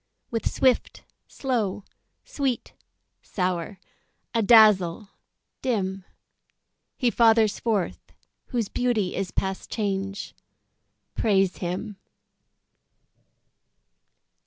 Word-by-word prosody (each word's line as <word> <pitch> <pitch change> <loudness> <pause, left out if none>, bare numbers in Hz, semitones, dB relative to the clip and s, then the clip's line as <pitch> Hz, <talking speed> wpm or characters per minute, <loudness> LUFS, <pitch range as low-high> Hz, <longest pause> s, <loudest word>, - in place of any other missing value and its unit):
With 230 -1 -1
swift, 260 -2 +1 0.2
slow; 225 -7 -2 0.4
sweet, 270 -4 -2 0.5
sour; 180 0 -2 0.6
adazzle, 210 -4 +5 0.5
dim; 195 -7 -2 0.9
He 245 -2 +2
fathers 225 -1 +4
forth 215 -6 -1 0.5
whose 235 -5 -1
beauty 220 -5 0
is 195 -1 -2
past 190 +1 -3
change: 195 -2 -3 0.8
Praise 195 -4 +2
him. 190 +4 -4
210 Hz, 70 wpm, -25 LUFS, 190-230 Hz, 0.9 s, adazzle